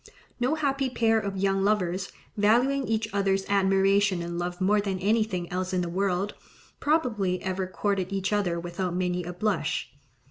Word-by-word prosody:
No 250 +5 +1
happy 275 -3 0
pair 225 -2 +2
of 200 -2 -4
young 195 0 +1
lovers, 195 -2 0 0.2
valuing 245 +6 +3
each 220 -1 0
other's 195 -1 +1
admiration 195 -1 +3
and 170 0 -4
love 175 0 -3
more 205 +2 +3
than 195 -2 -2
anything 205 -2 0
else 185 +1 -2
in 180 - +1
the 175 - -2
world, 190 +2 0 0.5
probably 220 - +1
ever 190 0 -2
courted 190 0 -1
each 195 +1 -1
other 180 -5 +1
without 175 +1 -3
many 180 -1 -1
a 175 - -5
blush. 175 - -1
195 Hz, 165 wpm, -27 LUFS, 180-210 Hz, 0.5 s, valuing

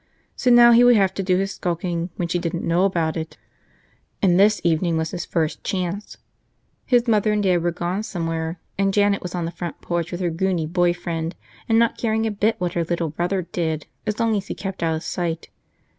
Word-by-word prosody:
So 255 - +1
now 240 0 +8
he 235 +1 +7
would 245 0 +7
have 195 -3 +3
to 195 - -3
do 185 -1 +2
his 195 +1 -1
skulking 175 -1 -2
when 175 - -2
she 175 +1 -1
didn't 170 0 -3
know 175 +3 +3
about 170 -5 0
it, 160 -1 -5 0.8
and 180 -2 +3
this 210 +1 +5
evening 165 0 +1
was 160 0 -2
his 175 -1 -4
first 160 -2 -2
chance. 190 +2 -3 0.7
His 245 -1 +3
mother 215 -1 +3
and 210 -1 +1
dad 180 -3 +2
were 175 - +1
gone 175 +3 -2
somewhere, 165 -4 -3 0.2
and 195 -1 +2
Janet 205 -1 +3
was 180 0 -6
on 175 -2 -2
the 165 - -4
front 170 -2 -6
porch 170 -1 -3
with 175 +1 -4
her 175 -2 0
goony 175 -1 0
boy 175 +1 +2
friend 165 -1 -4 0.3
and 225 - +4
not 230 0 +2
caring 220 -1 0
a 220 - 0
bit 210 +2 +1
what 180 -1 -2
her 170 - 0
little 170 -1 -2
brother 175 +4 -1
did 160 -3 -3 0.2
as 215 +1 -2
long 230 -1 +2
as 200 -1 -3
he - - -4
kept 195 -1 -6
out 165 -1 +1
of 160 - -5
sight. 170 -3 -3
180 Hz, 220 wpm, -22 LUFS, 170-200 Hz, 0.8 s, now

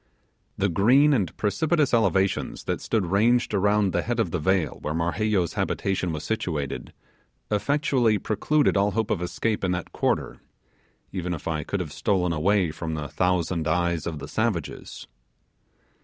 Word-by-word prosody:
The 100 - +2
green 125 - +4
and 95 - -1
precipitous 145 - +1
elevations 95 -4 +1
that - - -2
stood 110 -5 0
ranged 110 +7 +2
around 105 -1 +2
the 85 - +1
head 120 +3 -2
of 95 -7 0
the 90 - -1
vale 90 -2 0
where 75 - -3
Marheyo's 85 +2 0
habitation 95 -2 -1
was 75 -1 -4
situated 80 -11 -3 0.6
effectually 125 -1 +2
precluded 145 +9 +1
all 100 +1 +3
hope 110 0 -1
of 90 - 0
escape 105 +5 -2
in 90 -1 +1
that 90 0 -4
quarter, - - -1 0.7
even 90 -2 -3
if 80 - -9
I 80 -2 -1
could 100 +5 -2
have 75 -5 -6
stolen 90 -5 +1
away 90 +2 +2
from 80 0 -4
the 75 -2 -5
thousand 90 -2 0
eyes 85 0 0
of 80 -3 -4
the 70 - -7
savages. 110 -9 -3
95 Hz, 155 wpm, -25 LUFS, 85-110 Hz, 0.7 s, green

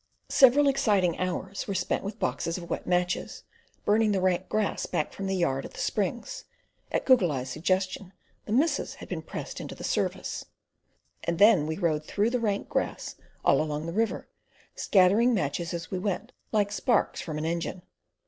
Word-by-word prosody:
Several 275 +2 +6
exciting 210 -11 +2
hours 185 +2 -3
were 200 - -2
spent 180 -1 -1
with 200 +2 -5
boxes 165 -6 -1
of 170 -2 -8
wax - - -3
matches, 180 0 -1 0.4
burning 215 0 +3
the 195 - +1
rank 185 0 +1
grass 215 -1 0
back 150 - -2
from 195 - -4
the 190 - 0
yard 135 -7 0
at - - -9
the - - -9
springs - - -2 0.5
(at - - 0
Goggle 240 - +5
Eye's 130 -2 -3
suggestion 185 +4 -1 0.3
the - - -6
missus 285 +9 +1
had - - -10
been - - -4
pressed - - -6
into - - -7
the - - -10
service); - - -1 0.8
and 170 0 -1
then 200 -7 +6
we 160 - -2
rode 160 -5 0
through 210 +8 0
the 250 - +1
rank 205 -3 -1
grass - - -2 0.3
along 150 0 +2
the 170 - -4
river, 225 +2 -1 0.5
scattering 210 +6 +4
matches 170 0 -1
as 170 -1 -5
we 185 - -1
went 200 +4 -3 0.2
like 205 -2 +2
sparks 205 +3 +1
from 155 -3 -5
an 155 - -2
engine. 170 +2 -3
185 Hz, 175 wpm, -28 LUFS, 170-215 Hz, 0.8 s, Several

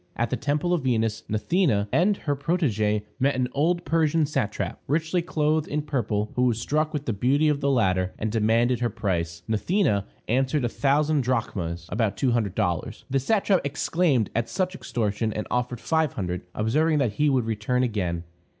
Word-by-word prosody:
At 120 -1 -1
the - - +2
temple 150 +5 0
of 175 - +1
Venus, 115 -4 0
Gnathena 110 - +1
and 195 +4 +3
her 145 -2 -1
protegée 120 - 0 0.2
met 140 +1 +2
an 125 -1 0
old 170 +5 +1
Persian 160 -1 +2
satrap, 105 - -2
richly 160 +4 +1
clothed 155 -2 0
in 150 0 -2
purple, 110 -8 -1
who 125 - +1
was 120 -3 +2
struck 155 +5 0
with 145 -1 -4
the 115 - -1
beauty 140 +9 +2
of 145 -1 0
the 140 - +1
latter, 95 -8 +2
and 110 0 -2
demanded 115 +3 +2
her 120 -1 0
price. 85 -5 -2
Gnathena 110 - +1 0.2
answered, 130 +3 +1
a - - 0
thousand 145 +3 +2
drachmas 95 -9 -2
(about 105 -2 0
two 130 - +2
hundred 110 -6 0
dollars). 85 -2 -2
The 135 - +2
satrap 195 - +2
exclaimed 140 - +1
at 115 0 0
such 185 -1 -1
extortion, 110 - -2
and 105 - -3
offered 125 -1 -1
five 160 0 +1
hundred, 90 -2 -3
observing 150 +9 +2
that 125 -7 +1
he 150 +7 +2
would 130 -4 +2
return 115 +3 0
again. 90 -8 -1
125 Hz, 180 wpm, -25 LUFS, 105-150 Hz, 0.2 s, and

